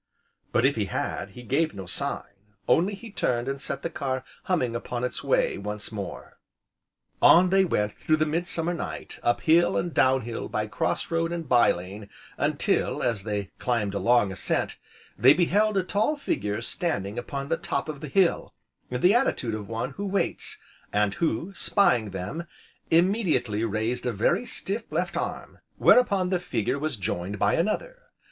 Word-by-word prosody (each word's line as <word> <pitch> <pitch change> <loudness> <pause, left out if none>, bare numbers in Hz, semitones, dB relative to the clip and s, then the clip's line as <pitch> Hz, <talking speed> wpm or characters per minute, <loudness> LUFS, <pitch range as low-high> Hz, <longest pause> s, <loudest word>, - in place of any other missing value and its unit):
But, 120 - +3
if 140 -2 +2
he 105 - +1
had, 95 - -3
he 125 - -8
gave 150 +5 0
no 95 -1 -6
sign, - - -4 0.4
only 195 +5 +3
he 225 +2 -11
turned 120 - -1
and 135 0 -3
set - - -4
the 170 - -1
car 130 -4 -2 0.2
humming 130 -11 0
upon 120 +1 -4
its 125 - -2
way, - - +1
once 105 +2 -5
more. 100 -3 -7 0.8
On 180 +1 +7
they 195 0 +5
went 105 - 0
through 155 - +1
the 155 - +2
midsummer 170 +2 -1
night, 170 - -6
up 120 - +1
hill 170 +2 +4
and 170 -1 -2
down 130 0 +4
hill, 115 0 -5
by - - -1
cross - - -2
road 165 0 0
and 170 -3 -4
bye 120 -2 +5
lane, 100 +4 -7 0.3
until, - - 0
as 110 -5 -1
they 105 -2 -3
climbed 115 -5 0
a 100 - -1
long 120 -5 +3
ascent, 95 - -1 0.4
they 130 +6 +7
beheld 200 +5 +2
a 190 - +2
tall 215 - 0
figure 105 - -2
standing 115 - -2
upon 140 +3 -5
the 165 - +2
top 140 +1 -2
of 155 -2 -5
the 155 - -5
hill, 180 +4 +1 0.3
in 125 0 -3
the 185 - +6
attitude 230 - +1
of 105 -2 -5
one 115 0 -3
who 200 0 -5
waits; 195 +1 -1 0.3
and 105 -1 +2
who, 165 - 0
spying 125 - +2
them, 100 - -5 0.4
immediately 165 - +2
raised 115 +3 -1
a - - +1
very 115 - +1
stiff 215 +4 -4
left - - -1
arm, - - -4 0.2
whereupon 200 -7 +4
this 180 -2 +1
figure 130 - -1
was 155 -3 -2
joined 95 +1 -3
by 100 +1 +2
another. - - -1
135 Hz, 175 wpm, -26 LUFS, 110-175 Hz, 0.8 s, On